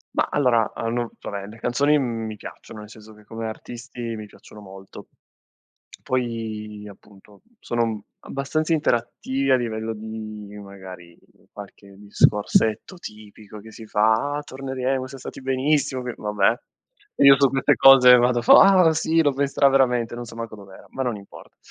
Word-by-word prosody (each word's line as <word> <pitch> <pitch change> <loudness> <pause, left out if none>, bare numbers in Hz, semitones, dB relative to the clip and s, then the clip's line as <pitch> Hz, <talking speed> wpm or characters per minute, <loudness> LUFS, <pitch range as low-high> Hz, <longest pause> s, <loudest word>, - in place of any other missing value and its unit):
Ma - - +1
allora 120 -6 +2
hanno 115 +1 -3
vabbè 100 -1 -6
le 110 +2 -12
canzoni, 145 +5 +2
m 115 -4 -3
mi 110 -1 -7
piacciono, 105 - -11
nel 105 0 -11
senso 110 0 -14
che 105 0 -20
come 115 0 -6
artisti 120 +1 -7
mi 110 -1 -8
piacciono 105 - -16
molto. 95 -1 -13 1.0
Poi 110 -4 -4
appunto 100 0 -18 0.2
sono 115 -3 -2 0.2
abbastanza 155 +4 -2
interattivi 135 -1 -1
a - - +6
livello 115 -2 -3
di 110 -1 -8
magari 95 -3 -12 0.3
qualche 100 -1 -13
discorsetto 105 - +1
tipico 105 - -12
che 110 +2 -13
si 110 0 -12
fa 110 +8 +1
"Ah - - -4
torneremo, 130 -1 -3
siam 135 0 -11
stati 130 - -9
benissimo" 135 0 0
che 125 -1 -5
vabbè 105 +2 0 0.6
io 140 -1 +7
su 140 -1 +4
queste 135 0 +2
cose 130 -2 +8
vado 120 0 +2
fo - - +7
"Ah 185 -4 +6
sì, 160 +1 +1
lo 145 -2 +2
penserà 140 0 +2
veramente" 125 -4 +1
non 120 0 -7
so 115 - -12
manco 115 -2 -7
dov'era, 100 -2 -14
ma 135 - -5
non 120 -3 -2
importa. 100 - -15
115 Hz, 160 wpm, -22 LUFS, 105-130 Hz, 1.0 s, cose